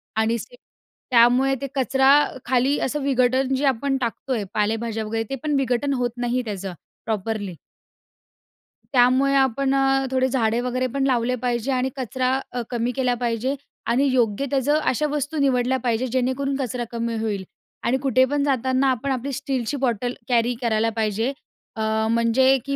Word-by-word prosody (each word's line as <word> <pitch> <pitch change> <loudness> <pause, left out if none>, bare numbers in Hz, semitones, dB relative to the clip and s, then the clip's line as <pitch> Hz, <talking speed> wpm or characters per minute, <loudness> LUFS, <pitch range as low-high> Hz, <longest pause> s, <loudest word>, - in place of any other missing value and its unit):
आणि 220 +1 +1
सिमेंट 245 +3 -11 0.5
त्यामुळे 250 +3 +5
ते 275 - -2
कचरा 265 0 +3 0.4
खाली 260 +3 +2
असं 295 +3 -2
विघटन 260 0 +2
जे 275 +2 0
आपण 270 +1 +1
टाकतो 245 +2 -2
आहे, 225 -4 -1
पालेभाज्या 220 +1 -1
वगैरे 225 +1 -2
ते 270 - -2
पण 300 -1 0
विघटन 270 +1 0
होत 245 -2 -1
नाही 245 +1 0
त्याचं 195 -3 -5 0.3
प्रॉपरली. 215 -3 -3 1.4
त्यामुळे 260 +2 +4
आपण 270 0 +2
अ, 270 0 +2
थोडे 260 0 +2
झाडे 235 -3 +1
वगैरे 250 +1 -1
पण 275 -1 0
लावले 250 -1 +1
पाहिजे 245 +1 0
आणि 255 0 0
कचरा 260 +1 0
अ, 245 - -3
कमी 240 0 -1
केला 255 -2 +1
पाहिजे 240 +3 0 0.3
आणि 245 +4 +2
योग्य 240 0 +1
त्याचं 285 +2 +2
अशा 300 0 0
वस्तू 295 +1 -2
निवडल्या 260 -2 +2
पाहिजे, 240 +1 0
जेणेकरून 260 +2 -1
कचरा 250 -3 -2
कमी 235 0 -2
होईल. 205 -3 -2 0.4
आणि 245 +3 +2
कुठे 260 -1 +3
पण 290 -1 +1
जाताना 260 -1 +1
आपण 260 +2 -2
आपली 265 +2 -2
स्टीलची 270 -1 -2
बॉटल 245 -2 -1 0.2
कॅरी 240 0 +2
करायला 225 -1 +1
पाहिजे, 220 +3 0 0.4
अ, 220 0 0
म्हणजे, 235 +3 +4
की 275 0 -2
250 Hz, 160 wpm, -23 LUFS, 230-270 Hz, 1.4 s, त्यामुळे